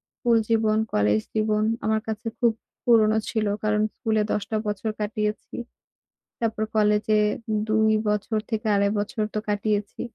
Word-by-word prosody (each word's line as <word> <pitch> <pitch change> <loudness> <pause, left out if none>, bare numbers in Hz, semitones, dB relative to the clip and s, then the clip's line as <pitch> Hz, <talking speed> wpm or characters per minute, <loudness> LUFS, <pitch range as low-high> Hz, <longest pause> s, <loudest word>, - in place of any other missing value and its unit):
School 235 -2 +2
জীবন, 220 -1 +3 0.2
college 105 +1 +3
জীবন, 215 0 +1 0.2
আমার 220 0 +1
কাছে 220 +1 -4
খুব 235 -2 +4 0.3
পুরনো 220 -2 +4
ছিল। 220 -1 0 0.2
কারণ 210 0 +2
স্কুলে 220 -3 0
১০ 205 - 0
টা 220 - 0
বছর 210 +2 -2
কাটিয়েছি। 210 0 -3 0.9
তারপর 220 -1 0
কলেজে 210 0 +3 0.5
২ 220 0 +3 0.2
বছর 210 +1 0
থেকে 220 0 -2
২.৫ 200 0 +3
বছর 215 +2 -2
তো - - 0
কাটিয়েছি। 205 0 -1
215 Hz, 140 wpm, -25 LUFS, 210-220 Hz, 0.9 s, খুব